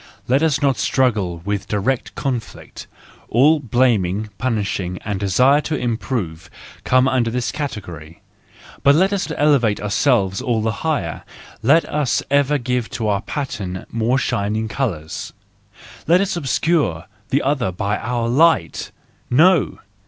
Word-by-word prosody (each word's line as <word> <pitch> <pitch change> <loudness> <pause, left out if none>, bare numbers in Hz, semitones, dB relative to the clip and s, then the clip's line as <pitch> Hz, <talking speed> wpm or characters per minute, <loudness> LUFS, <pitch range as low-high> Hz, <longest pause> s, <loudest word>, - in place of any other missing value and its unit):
Let 130 +4 +3
us 155 -2 +1
not 135 -4 +2
struggle 105 -9 0
in 100 0 0
direct 110 +5 -1
conflict!—all 135 +2 -1
blaming, 110 -5 +1
punishing, 100 -7 -2
and 100 -2 -2
desire 125 +9 +3
to 155 - -3
improve 110 - -3 0.3
comes 130 +1 +3
under 120 -3 +1
this 125 +1 -2
category. 90 - -7 0.6
But 140 +1 +5
let 190 +5 +3
us 190 -5 -2
elevate 140 -8 +3
ourselves 105 -2 +1
all 115 -3 0
the 110 - +1
higher! 145 - -2 0.4
Let 145 +8 +4
us 150 -4 0
ever 145 +1 +3
give 125 -2 -2
to 110 -2 -1
our 100 -1 0
pattern 100 -9 -5
more 115 +3 +1
shining 110 -2 -1
colours! 95 - -4 0.7
Let 175 +3 +5
us 195 -1 0
obscure 145 - 0 0.2
the 140 - +1
other 135 -7 0
by 100 +3 -2
our 120 -1 -2
light! 140 - +2 0.4
No 165 +5 +3
120 Hz, 130 wpm, -20 LUFS, 100-140 Hz, 0.7 s, But